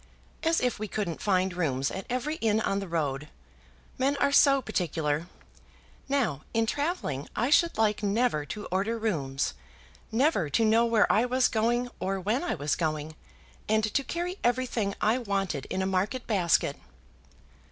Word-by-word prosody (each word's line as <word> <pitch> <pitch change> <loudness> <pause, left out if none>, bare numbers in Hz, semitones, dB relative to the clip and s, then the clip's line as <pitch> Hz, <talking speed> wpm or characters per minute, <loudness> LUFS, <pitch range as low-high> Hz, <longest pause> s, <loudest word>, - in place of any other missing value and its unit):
"As 325 0 +2
if 250 -3 -1
we 215 - -3
couldn't 195 -5 -3
find 185 -2 +1
rooms 140 -6 -1
at 190 - -6
every 270 +6 -2
inn 220 -1 +2
on 195 -2 0
the 195 - -5
road. 150 -4 -2 0.7
Men 275 +2 +2
are 280 0 +2
so 280 -1 +6
particular. 165 - -1 0.8
Now 240 - 0
in 225 0 +3
travelling 285 - -2
I 245 +5 0
should 335 +3 +4
like 215 -1 +2
never 210 -5 +1
to 210 -1 -6
order 200 +5 0
rooms, 145 -12 -1 0.6
never 225 - +2
to 225 +10 +2
know 225 +2 +4
where 225 -3 +4
I 225 +3 +3
was 255 +1 +3
going 240 +2 +1
or 195 +1 -1
when 215 - 0
I 350 - -1
was 145 +1 -1
going, 155 -1 -2 0.6
and 220 0 +3
to 275 - +2
carry 350 +5 -3
everything 240 -4 0
I 220 +4 +2
wanted 195 - -2
in 190 - -2
a - - 0
market 190 +7 -1
basket." 185 -6 +2
215 Hz, 165 wpm, -28 LUFS, 175-250 Hz, 0.8 s, so